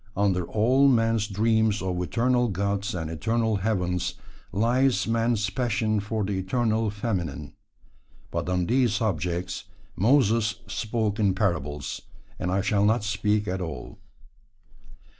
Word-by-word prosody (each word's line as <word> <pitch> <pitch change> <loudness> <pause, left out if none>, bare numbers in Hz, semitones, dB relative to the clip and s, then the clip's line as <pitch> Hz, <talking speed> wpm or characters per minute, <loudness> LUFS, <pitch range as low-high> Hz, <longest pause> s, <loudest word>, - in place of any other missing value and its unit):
Under 95 -3 +1
all 125 +6 +3
man's 115 -4 +2
dreams 110 +1 +2
of 90 -1 -2
eternal 120 +6 +1
gods 100 0 -1
and 80 -3 -3
eternal 110 +7 0
heavens 90 -3 -1 0.4
lies 125 +5 +2
man's 115 -1 +1
passion 110 -2 0
for 105 +1 -2
the 95 -1 -1
eternal 110 +2 0
feminine. 90 - -3 0.8
But - - -2
on 90 -1 +1
these 120 +1 +2
subjects 90 -2 -2 0.3
"Moses" 115 -2 +3
spoke 105 +2 -2
in 100 -3 +2
parables, 75 - -2 0.4
and 90 - -2
I 95 +1 +1
shall 100 0 +1
not 110 +1 +3
speak 105 0 0
at 95 +1 -2
all. 75 -8 -6
105 Hz, 125 wpm, -26 LUFS, 95-115 Hz, 0.8 s, all